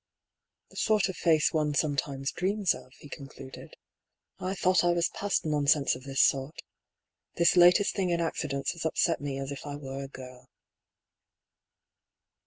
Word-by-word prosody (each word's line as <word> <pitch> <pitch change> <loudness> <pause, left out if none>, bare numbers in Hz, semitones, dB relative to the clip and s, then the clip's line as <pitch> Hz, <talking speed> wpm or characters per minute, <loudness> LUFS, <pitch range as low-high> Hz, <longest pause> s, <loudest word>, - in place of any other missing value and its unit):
" - - -57
The - - -14
sort 215 -3 +2
of 190 - -5
face 160 -3 +2
one 150 -2 0
sometimes 140 -2 -1
dreams 195 +1 0
of," 130 0 -12
he - - -13
con 140 -1 -9
cluded. 135 -1 -12 0.3
" - - -49
I 185 +1 -3
thought 185 -1 +2
I 175 0 +3
was 170 0 +1
past 200 -4 -2
nonsense 145 -2 +2
of 125 +1 -9
this 135 0 +2
sort. 135 +3 0 0.8
This 170 +1 +3
latest 180 +3 +5
thing 190 -3 -1
in 170 -1 0
accidents 145 -4 -2
has 170 - -7
upset 160 0 0
me 140 -2 -4
as 135 0 -5
if 140 - -7
I 145 -1 -6
were 135 -1 -7
a - - -7
girl." 130 -1 -12
150 Hz, 175 wpm, -28 LUFS, 135-175 Hz, 0.8 s, latest